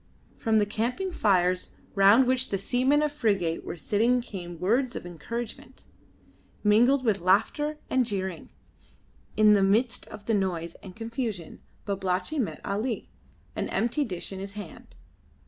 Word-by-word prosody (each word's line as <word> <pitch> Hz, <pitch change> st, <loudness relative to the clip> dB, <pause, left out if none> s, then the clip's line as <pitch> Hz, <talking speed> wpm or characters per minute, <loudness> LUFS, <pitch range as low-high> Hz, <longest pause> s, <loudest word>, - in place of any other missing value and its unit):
From 220 Hz, -1 st, +1 dB
the 210 Hz, -, +4 dB
camping 245 Hz, -, -2 dB
fires 185 Hz, -, +1 dB, 0.2 s
round 200 Hz, +6 st, +6 dB
which 255 Hz, 0 st, +1 dB
the 195 Hz, -, 0 dB
seamen 260 Hz, +8 st, +2 dB
of 300 Hz, -, 0 dB
the 295 Hz, -, -20 dB
frigate 195 Hz, -, +1 dB
were -, -, -6 dB
sitting 230 Hz, +8 st, +2 dB
came 175 Hz, -7 st, -7 dB
words 240 Hz, +7 st, +1 dB
of -, -, -5 dB
encouragement, 215 Hz, +8 st, -7 dB, 0.8 s
mingled 245 Hz, +6 st, +4 dB
with 205 Hz, -5 st, +2 dB
laughter 225 Hz, -, +2 dB
and 260 Hz, -1 st, +2 dB
jeering. 190 Hz, -6 st, -4 dB, 0.9 s
In 215 Hz, -1 st, +7 dB
the 200 Hz, -, +4 dB
midst 225 Hz, +6 st, +1 dB
of 210 Hz, -1 st, -11 dB
this 225 Hz, -, +1 dB
noise 175 Hz, -4 st, -1 dB
and 185 Hz, -2 st, -11 dB
confusion 225 Hz, -, -5 dB, 0.2 s
Babalatchi 195 Hz, +8 st, -1 dB
met 235 Hz, -, -2 dB
Ali, 215 Hz, +3 st, -2 dB, 0.5 s
an -, -, -2 dB
empty 240 Hz, +6 st, +1 dB
dish 180 Hz, -8 st, -5 dB
in 190 Hz, -, -6 dB
his 195 Hz, +1 st, -7 dB
hand. 205 Hz, -5 st, -10 dB
210 Hz, 150 wpm, -27 LUFS, 190-245 Hz, 0.9 s, In